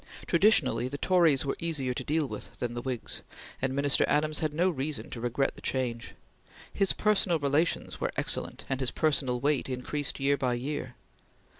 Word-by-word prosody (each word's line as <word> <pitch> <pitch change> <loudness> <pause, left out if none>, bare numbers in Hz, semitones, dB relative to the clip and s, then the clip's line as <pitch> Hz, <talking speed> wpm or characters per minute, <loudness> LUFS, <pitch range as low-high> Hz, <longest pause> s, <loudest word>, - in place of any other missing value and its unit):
Traditionally 155 - +4
the 140 +2 -5
Tories 165 -6 +3
were 135 - -1
easier 150 -7 -1
to - - -4
deal 155 -1 0
with - - -9
than 120 -1 -3
the 120 - -4
Whigs, 125 -2 -3 0.4
and 130 0 0
Minister 140 0 +4
Adams 155 0 +1
had 155 -1 -1
no 170 +5 +1
reason 145 0 -4
to 115 - -6
regret 125 +3 0
the - - -13
change. 120 -3 -2 0.6
His 195 -2 +3
personal 200 -5 +2
relations 145 +3 0
were - - 0
excellent - - -2
and 135 - -2
his 130 -2 +1
personal 140 -5 0
weight 140 0 0
increased 130 +3 -2
year 140 +1 +2
by 125 -3 0
year. 130 0 -4
140 Hz, 175 wpm, -29 LUFS, 130-155 Hz, 0.6 s, Traditionally